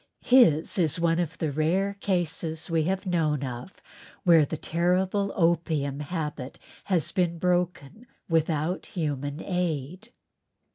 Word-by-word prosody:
His 210 - +4
is 160 -2 +2
one 165 0 +2
of 165 -2 -2
the 155 -3 -1
rare 175 +7 +1
cases 170 -4 -2
we 160 -2 +2
have 190 +3 -1
known 155 -6 0
of, 125 +5 -6 0.5
where 165 -4 +6
the 160 - -4
terrible 185 +5 0
opium 160 -5 +1
habit 150 -4 -5 0.3
has 180 -6 0
been 175 -2 0
broken 180 - -1 0.2
without 160 +1 0
human 145 -3 -3
aid. 180 - -3
165 Hz, 125 wpm, -26 LUFS, 150-180 Hz, 0.5 s, where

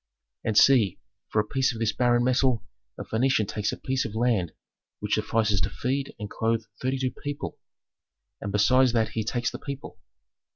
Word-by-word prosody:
"And 110 -2 0
see, 115 -9 +5 0.3
for 110 - +1
a 105 - +2
piece 135 +3 +1
of - - -7
this 110 -2 +1
barren 120 +2 +3
metal 125 -1 +2 0.3
a - - -5
Phœnician 115 -2 +1
takes 105 +1 -1
a - - -5
piece 130 0 -1
of 110 - -6
land 110 -7 +1 0.5
which - - -2
suffices 105 -3 +1
to - - 0
feed 135 +2 -3
and 105 - -5
clothe 115 +1 -1 0.2
thirty 130 +1 0
two 130 -1 -1
people, 145 0 -6 0.8
and 100 - -4
besides 125 +5 +4
that 110 -2 +2
he 110 +1 -2
takes 120 +2 -1
the - - -7
people. 140 -1 -7
115 Hz, 180 wpm, -26 LUFS, 110-130 Hz, 0.8 s, see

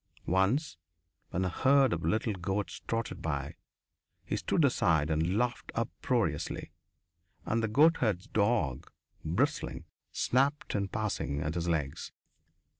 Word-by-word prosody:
Once, 95 - +1 0.5
when 95 +1 -1
a - - 0
herd 135 +8 +4
of - - -3
little 110 0 +1
goats 95 +2 -3
trotted 115 0 -2
by, 70 -3 -2 0.7
he - - -2
stood - - +2
aside 80 -2 +2
and 80 +5 +1
laughed 120 +1 -1
uproariously, - - -1 0.7
and 115 +1 +1
the 115 - +1
goatherd's 115 - +3
dog, 105 - 0 0.3
bristling, 80 +2 -1 0.3
snapped 140 +4 +1
in 100 -1 0
passing 105 -9 -2
at 75 +1 -2
his 85 0 -2
legs. 75 -5 -2
100 Hz, 120 wpm, -31 LUFS, 80-115 Hz, 0.7 s, herd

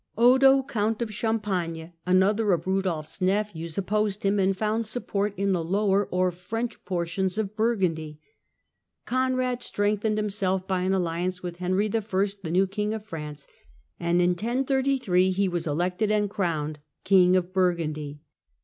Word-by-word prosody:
Odo, 265 +3 +6
Count 220 -3 -1
of 215 -2 -6
Champagne, 190 -7 -2
another 200 +3 +3
of 170 -1 -1
Rudolfs 185 -4 -2
nephews, 185 -4 -1
opposed 205 +1 -1
him, 200 +1 +2
and 190 0 +2
found 215 +2 -1
support 210 -3 -2
in 200 +1 +1
the 175 -3 0
lower 200 +3 +1
or 185 0 +1
French 225 +7 -5
portions 180 +1 -1
of 215 -1 -2
Burgundy. 180 -9 0 0.9
Conrad 255 -1 0
strengthened 210 -1 0
himself 195 -3 -1
by 185 -1 0
an 185 +1 +1
alliance 180 +1 -2
with 175 -1 -5
Henry 185 +3 0
I., - - -2
tlie 195 -3 -2
new 185 +3 +4
King 210 +2 -2
of 215 -1 -7
France, 150 -6 -7 0.5
and 175 +1 +2
in 175 - +3
1033 250 -2 +1
he 195 +1 +1
was 175 -2 -2
elected 180 +7 0
and 210 -1 +1
crowned 155 -7 -2 0.2
King 185 -1 +5
of 185 0 0
Burgundy. 155 -6 -1
190 Hz, 150 wpm, -26 LUFS, 175-215 Hz, 0.9 s, Odo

